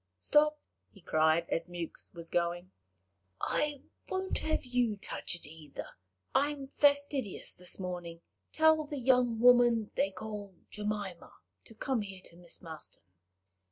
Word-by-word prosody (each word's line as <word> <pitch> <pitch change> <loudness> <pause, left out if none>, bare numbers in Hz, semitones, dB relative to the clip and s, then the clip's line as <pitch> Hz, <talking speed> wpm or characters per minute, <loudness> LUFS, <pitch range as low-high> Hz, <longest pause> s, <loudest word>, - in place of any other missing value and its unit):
Stop," 300 - +4 0.3
he 195 - -18
cried, 160 0 +3
as 165 - 0
Mewks 175 -2 -6
was 170 -1 -9
going, 175 +1 0 0.7
"I 295 -2 0 0.3
won't 375 0 -1
have 315 -3 -1
you 245 -4 +1
touch 190 - -2
it 170 - -5
either; 150 -1 -9 0.4
I 285 +2 +4
am 285 -2 -5
fastidious 285 -6 +2
this 180 0 -4
morning. 175 -2 -5 0.3
Tell 315 0 +5
the 295 -1 -5
young 250 -3 +3
woman 240 -2 +6
they 195 - +2
call 205 0 -7 0.2
Jemima 205 -4 -4 0.3
to 225 - -13
come 255 +1 0
here 195 -2 -7
to 170 - -13
Miss 175 0 -12
Marston." 160 - -9
210 Hz, 140 wpm, -32 LUFS, 175-265 Hz, 0.7 s, woman